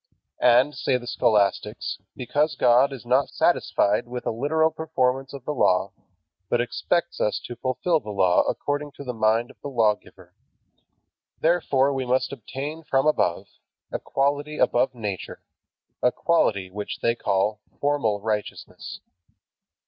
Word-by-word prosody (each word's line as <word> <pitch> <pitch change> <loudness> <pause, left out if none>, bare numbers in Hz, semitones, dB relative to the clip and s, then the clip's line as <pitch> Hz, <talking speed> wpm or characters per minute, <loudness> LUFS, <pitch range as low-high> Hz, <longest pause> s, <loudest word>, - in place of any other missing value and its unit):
And, 125 +4 +5
say 130 - 0
the 120 - -10
scholastics, 105 -4 0 0.2
because 145 +5 0
God 125 +3 +4
is 130 -3 -8
not 130 +3 +2
satisfied 105 +4 +1
with 125 0 -6
a - - 0
literal 160 +7 +1
performance 135 -5 -1
of 140 -3 -9
the 150 - -2
Law, 95 -7 +2 0.6
but 120 - +2
expects 170 +8 -1
us 105 - +1
to 120 - -7
fulfill 145 +8 0
the 110 - -10
Law 95 -3 +3
according 145 0 -3
to 140 - -9
the 125 -2 -4
mind 110 +1 +1
of - - -24
the - - -6
Lawgiver, 110 -5 -1 1.1
therefore 140 -5 +2
we 130 -2 -3
must 130 +2 +1
obtain 140 +6 -6
from 135 -2 +1
above 155 - +1 0.5
a - - -2
quality 145 +2 -1
above 125 0 +2
nature, 105 -6 -5 0.6
a 125 - +4
quality 100 - +1
which 105 +1 -6
they 115 - +2
call 105 -2 0 0.2
"formal 140 -8 0
righteousness." 105 -1 -5
125 Hz, 140 wpm, -24 LUFS, 110-145 Hz, 1.1 s, And